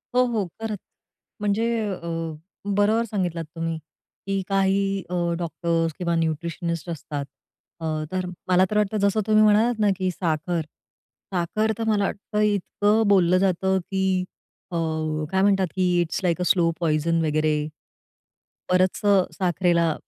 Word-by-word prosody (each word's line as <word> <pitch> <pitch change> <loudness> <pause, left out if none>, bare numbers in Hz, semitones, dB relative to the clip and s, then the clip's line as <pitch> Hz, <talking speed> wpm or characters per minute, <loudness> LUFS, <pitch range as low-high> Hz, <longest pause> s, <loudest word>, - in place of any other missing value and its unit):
हो, 250 - +6
हो, 225 -5 -1 0.2
खरंच. 220 -2 -3 0.6
म्हणजे 210 +2 +1 0.2
अ, 175 -3 -5 0.7
बरोबर 215 +3 +3
सांगितलात 180 -6 -2
तुम्ही, 165 0 -2 0.5
की 195 0 0
काही 195 0 +1
अ, - - -5 0.3
डॉक्टर्स 165 -1 -1
किंवा 170 -2 0
न्यूट्रिशनिस्ट 170 +1 -2
असतात. 150 -3 -4 0.5
अ, 165 - -5 0.3
तर 185 0 -1 0.2
मला 185 +1 +5
तर 210 - +1
वाटतं 210 0 +1
जसं 200 +2 +1
तुम्ही 215 0 +5
म्हणालात 215 +2 +4
ना, 210 - +3
की 185 -1 0
साखर, 170 0 -1 0.7
साखर 200 +5 0
तर 230 - -2
मला 210 -2 +2
वाटतं 210 +2 -3
इतकं 210 +1 +2
बोललं 185 -3 +5
जातं, 190 0 +2
की 190 +1 -3 0.7
अ, - - -4 0.6
काय 190 0 +2
म्हणतात 195 -1 +3
की 185 -1 +2 0.2
it's 170 - -2
like 175 -1 +1
a - - +2
slow 175 -2 +4
poison 165 0 +1
वगैरे 155 0 +1 1.2
बरचं 185 +2 +3
साखरेला 175 -2 +2
185 Hz, 135 wpm, -24 LUFS, 170-205 Hz, 1.2 s, हो